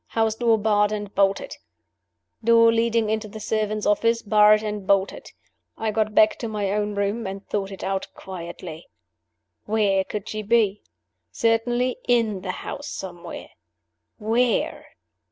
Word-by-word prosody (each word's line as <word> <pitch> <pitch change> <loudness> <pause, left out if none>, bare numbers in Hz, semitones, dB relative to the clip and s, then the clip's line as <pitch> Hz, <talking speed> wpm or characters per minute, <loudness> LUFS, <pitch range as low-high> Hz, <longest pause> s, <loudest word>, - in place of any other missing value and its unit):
House 225 -1 +1
door 230 0 +2
barred 210 -1 +2
and 205 -1 -4
bolted. 200 - +1 0.9
Door 230 0 +6
leading 230 -1 +1
into 220 0 -1
the 215 +1 -9
servants' 215 0 -1
offices 230 +3 +2
barred 210 0 +5
and 210 -2 -4
bolted. 195 -1 +1 0.5
I 220 -1 -1
got 215 0 -1
back 215 - +5
to 235 - -3
my 205 -3 -2
own 210 0 -1
room, 200 +2 -1
and 195 +1 -7
thought 195 -2 -2
it 195 - -8
out 195 0 -2
quietly. 170 -2 -8 0.8
Where 205 -3 +2
could 205 +1 -6
she 215 - -4
be? 210 -2 +2 0.5
Certainly 240 +2 +1
in 225 -5 +2
the 185 - -6 0.2
house, 285 +1 -6
somewhere. 175 -8 -7 0.7
Where? 230 +2 0
215 Hz, 140 wpm, -24 LUFS, 200-225 Hz, 0.9 s, Door